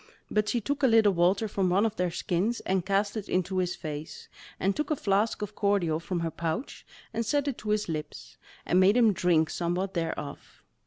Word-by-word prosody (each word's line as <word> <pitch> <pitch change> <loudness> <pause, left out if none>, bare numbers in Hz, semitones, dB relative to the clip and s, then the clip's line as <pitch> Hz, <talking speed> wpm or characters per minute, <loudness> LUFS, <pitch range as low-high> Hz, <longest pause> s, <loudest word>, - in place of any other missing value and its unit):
But 210 0 +1
she 240 - +1
took 285 +6 -2
a 265 - +5
little 225 -4 +5
water 185 +5 +2
from 195 -2 0
one 195 +4 +3
of 220 -1 -1
their 180 -2 0
skins, 180 +6 -1
and 190 -1 0
cast 200 +2 0
it 210 -2 -5
into 185 +1 0
his 180 -1 -1
face, 150 -1 -7 0.3
and 195 +1 +1
took 300 -1 -2
a 305 - +2
flask 210 -2 0
of 210 0 -5
cordial 200 -7 +1
from 170 +1 -3
her 165 -1 -2
pouch, 165 - -4 0.3
and 230 - -1
set 285 +5 0
it 275 - -2
to 215 - -6
his 210 0 +1
lips, 155 -2 -6 0.3
and 180 - +3
made 195 +5 +5
him 225 -4 +5
drink 170 -3 +2
somewhat 180 +3 -2
thereof. 165 -4 -5
195 Hz, 210 wpm, -28 LUFS, 175-215 Hz, 0.3 s, a